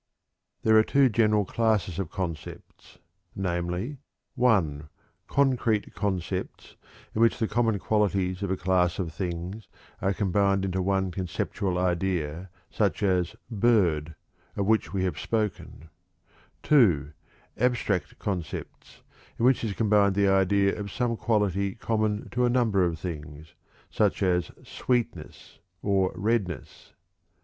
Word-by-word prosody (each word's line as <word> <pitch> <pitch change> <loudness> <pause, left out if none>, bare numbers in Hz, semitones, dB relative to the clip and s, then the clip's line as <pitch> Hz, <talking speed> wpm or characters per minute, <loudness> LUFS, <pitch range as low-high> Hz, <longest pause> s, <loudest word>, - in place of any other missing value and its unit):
There 110 0 +6
are - - +5
two 135 +2 +3
general 105 -2 +2
classes 105 -6 0
of 95 -5 -3
concepts, 85 -4 -7 0.4
namely: 90 +8 -2 0.3
(1) 90 - +1 0.4
concrete 125 -6 +1
concepts, 95 -2 -3 0.4
in 110 - -1
which 115 - +4
the 115 - 0
common 115 -3 +1
qualities 100 -3 0
of 100 - -2
a 95 - 0
class 90 -1 +1
of 85 -4 -3
things 90 +4 -5 0.3
are 95 - +1
combined 100 0 +1
into 95 0 -1
one 95 0 0
conceptual 90 +1 -2
idea, 90 -2 -1 0.2
such - - 0
as 90 0 +1 0.2
"bird," 90 -9 +2 0.4
of 100 - -1
which 110 +2 +2
we 95 -2 -1
have 95 - -2
spoken; 100 -7 -3 0.7
(2) 90 - +4 0.5
abstract 120 -6 0
concepts, 90 -6 -6 0.3
in 115 - +1
which 130 -1 +3
is 110 -3 -1
combined 100 -2 +3
the 100 0 +3
idea 100 +1 +3
of 100 -1 -5
some 120 -2 -1
quality 100 -4 0
common 110 -2 -1
to 125 0 0
a 120 - +3
number 115 -6 +2
of 85 -2 0
things, 75 -1 -7 0.4
such - - +1
as 90 -2 +1
"sweetness" 125 -2 -3 0.2
or 95 -2 +2
"redness." 100 - -3
100 Hz, 125 wpm, -27 LUFS, 90-110 Hz, 0.7 s, There